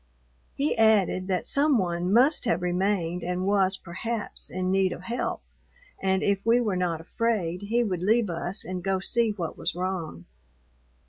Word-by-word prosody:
He 285 Hz, +2 st, 0 dB
added 205 Hz, -4 st, +3 dB
that 185 Hz, -2 st, -1 dB
some 285 Hz, -1 st, +3 dB
one 175 Hz, -2 st, -1 dB
must 255 Hz, +8 st, +4 dB
have 215 Hz, -6 st, 0 dB
remained 180 Hz, -1 st, 0 dB
and 180 Hz, +1 st, -2 dB
was, 195 Hz, -1 st, +2 dB
perhaps, 210 Hz, +6 st, -5 dB
in 185 Hz, 0 st, -2 dB
need 190 Hz, -1 st, +2 dB
of 180 Hz, -, -10 dB
help, 235 Hz, +5 st, -3 dB, 0.6 s
and 190 Hz, 0 st, +1 dB
if 200 Hz, -1 st, +1 dB
we 230 Hz, +2 st, +4 dB
were 215 Hz, -6 st, 0 dB
not 175 Hz, -3 st, -1 dB
afraid 185 Hz, -3 st, -1 dB
he 230 Hz, +4 st, +1 dB
would 185 Hz, -6 st, -2 dB
leave 220 Hz, +4 st, +3 dB
us 175 Hz, +3 st, -3 dB
and 180 Hz, -1 st, -5 dB
go 190 Hz, 0 st, 0 dB
see 230 Hz, +4 st, +1 dB
what 180 Hz, -6 st, -4 dB
was -, -, -2 dB
wrong. 175 Hz, -, -4 dB
190 Hz, 170 wpm, -26 LUFS, 180-220 Hz, 0.6 s, must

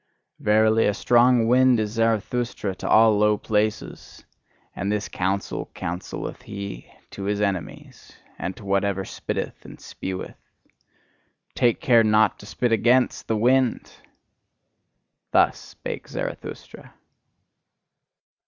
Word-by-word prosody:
Verily, 110 Hz, +1 st, +3 dB
a 105 Hz, -, 0 dB
strong 120 Hz, 0 st, +4 dB
wind 125 Hz, 0 st, +4 dB
is 105 Hz, -1 st, -1 dB
Zarathustra 115 Hz, -1 st, -1 dB
to -, -, -6 dB
all 110 Hz, -1 st, +5 dB
low 105 Hz, 0 st, +3 dB
places; 110 Hz, 0 st, -3 dB, 0.5 s
and 100 Hz, +2 st, -2 dB
this 105 Hz, 0 st, -1 dB
counsel 95 Hz, +2 st, -3 dB
counselleth 90 Hz, +2 st, -5 dB
he 100 Hz, -12 st, -8 dB, 0.2 s
to 100 Hz, -, -7 dB
his 100 Hz, 0 st, -1 dB
enemies, 100 Hz, -4 st, -4 dB, 0.3 s
and 95 Hz, -, -4 dB
to 110 Hz, -, -12 dB
whatever 100 Hz, 0 st, 0 dB
spitteth -, -, -5 dB
and -, -, -12 dB
speweth: 95 Hz, 0 st, -6 dB, 1.2 s
"Take 120 Hz, -2 st, +1 dB
care 120 Hz, -3 st, +5 dB
not 110 Hz, 0 st, +3 dB
to 105 Hz, -, -12 dB
spit 120 Hz, +1 st, -1 dB
AGAINST 120 Hz, +3 st, +2 dB
the 110 Hz, -, 0 dB
wind!" 125 Hz, +2 st, +1 dB, 1.4 s
Thus -, -, +3 dB
spake -, -, -8 dB
Zarathustra. -, -, -7 dB
110 Hz, 115 wpm, -24 LUFS, 100-115 Hz, 1.4 s, all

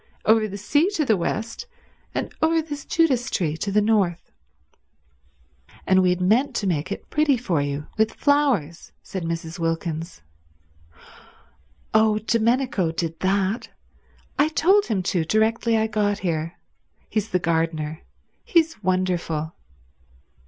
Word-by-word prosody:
Over 220 Hz, 0 st, +4 dB
the 200 Hz, -1 st, -7 dB
sea 290 Hz, -, +2 dB
to 310 Hz, -, +1 dB
the 220 Hz, -, +3 dB
west, 225 Hz, -, -3 dB, 0.5 s
and -, -, -3 dB
over 325 Hz, +1 st, +3 dB
this 295 Hz, -3 st, -5 dB
Judas 265 Hz, -7 st, +2 dB
tree 160 Hz, -4 st, -1 dB
to 200 Hz, -, -3 dB
the 210 Hz, +1 st, +3 dB
north." 200 Hz, -6 st, +1 dB, 1.5 s
"And 190 Hz, 0 st, +4 dB
we 185 Hz, -, +3 dB
had 180 Hz, 0 st, +1 dB
meant 220 Hz, +10 st, +2 dB
to 205 Hz, -, -1 dB
make 175 Hz, 0 st, -1 dB
it -, -, -6 dB
pretty 300 Hz, -3 st, +3 dB
for 185 Hz, -, 0 dB
you 145 Hz, +1 st, -3 dB
with 220 Hz, 0 st, +2 dB
flowers," 270 Hz, -, +1 dB
said 190 Hz, -, -5 dB
Mrs. 165 Hz, 0 st, -4 dB
Wilkins. 165 Hz, -, -3 dB, 1.7 s
"Oh, 220 Hz, -1 st, +4 dB
Domenico 230 Hz, -4 st, +1 dB
did 165 Hz, 0 st, -4 dB
that. 195 Hz, +3 st, 0 dB, 0.7 s
I 290 Hz, -, +5 dB
told 375 Hz, +6 st, +3 dB
him 200 Hz, -5 st, -1 dB
to 175 Hz, -2 st, 0 dB
directly 225 Hz, +5 st, +2 dB
I 220 Hz, -, +2 dB
got 210 Hz, -2 st, 0 dB
here. 165 Hz, -1 st, -2 dB, 0.5 s
He's 215 Hz, -1 st, -2 dB
the 180 Hz, -, +2 dB
gardener. 160 Hz, -2 st, -1 dB, 0.4 s
He's 325 Hz, -7 st, +1 dB
wonderful." 180 Hz, -4 st, -1 dB
200 Hz, 135 wpm, -23 LUFS, 170-235 Hz, 1.7 s, I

